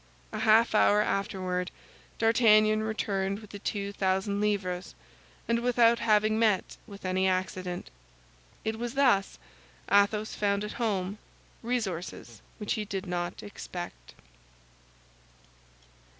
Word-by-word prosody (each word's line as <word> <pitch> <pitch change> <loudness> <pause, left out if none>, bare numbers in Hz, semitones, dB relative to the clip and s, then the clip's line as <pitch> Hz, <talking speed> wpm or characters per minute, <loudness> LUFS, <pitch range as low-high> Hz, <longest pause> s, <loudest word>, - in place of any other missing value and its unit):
A - - -4
half 225 +1 +4
hour 210 -1 +5
afterward, 185 -3 -2 0.5
D'Artagnan 215 -2 +4
returned 200 -3 -1
with 210 -1 -12
the 205 - -8
two 200 0 -3
thousand 195 +1 0
livres, 190 -4 -1 0.5
and 235 0 +2
without 235 -1 +4
having 215 -1 +3
met 215 -4 +1
with 200 -3 -11
any 185 +1 +1
accident. 185 -1 -2 0.7
It 220 0 -2
was 240 +1 -4
thus 245 - +3 0.5
Athos 205 +2 +3
found 200 0 0
at 210 - -4
home 205 -3 -2 0.4
resources 185 - -4 0.2
which 210 - -2
he 215 - -2
did 195 -2 -4
not 175 -1 -3
expect. 175 - -8
205 Hz, 115 wpm, -29 LUFS, 190-220 Hz, 0.7 s, hour